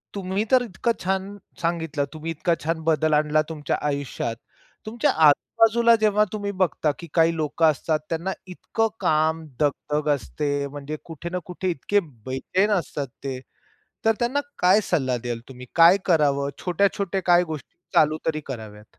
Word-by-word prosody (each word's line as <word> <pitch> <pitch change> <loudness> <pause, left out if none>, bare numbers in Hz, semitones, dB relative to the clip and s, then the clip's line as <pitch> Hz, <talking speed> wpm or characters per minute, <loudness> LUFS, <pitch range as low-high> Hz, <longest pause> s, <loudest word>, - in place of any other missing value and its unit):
तुम्ही 195 +1 -1
तर 255 -1 +6
इतकं 230 +1 -1
छान 190 +2 -2 0.2
सांगितलं. 165 -4 -1
तुम्ही 160 +1 -5
इतका 165 +2 0
छान 160 +1 -1
बदल 155 -1 +2
आणला 150 +1 +3
तुमच्या 150 -3 -2
आयुष्यात, 140 -5 -3 0.5
तुमच्या 225 +2 +1 0.2
आजूबाजूला 230 +9 +4
जेव्हा 210 -1 +4
तुम्ही 205 -1 -2
बघता 185 -5 +1
की 170 - -8
काही 165 0 +4
लोकं 155 +1 0
असतात, 155 +1 -1
त्यांना 170 +3 -2 0.2
इतकं 225 +4 -1
काम, 160 +1 +2 0.2
दगदग 150 +1 0
असते 145 0 -2
म्हणजे 145 +2 -6
कुठे 165 +1 -7
ना 180 +1 -2
कुठे 185 +1 -3
इतके 190 +6 +1 0.3
बैचैन 185 +11 0
असतात 150 -7 -1 0.2
ते, 135 -2 -4 0.7
तर 225 0 +4
त्यांना 245 +4 +1 0.2
काय 185 +4 +5
सल्ला 130 -7 +1
द्याल 120 -2 -3
तुम्ही? 125 -1 -10
काय 170 +3 +7
करावं 140 -5 +2
छोट्या-छोट्या 195 +1 0
काय 175 0 +6
गोष्टी 155 -4 -8 0.2
चालू 155 0 +4
तरी 155 -1 0
कराव्यात? 105 -5 -9
165 Hz, 150 wpm, -24 LUFS, 145-190 Hz, 0.7 s, काय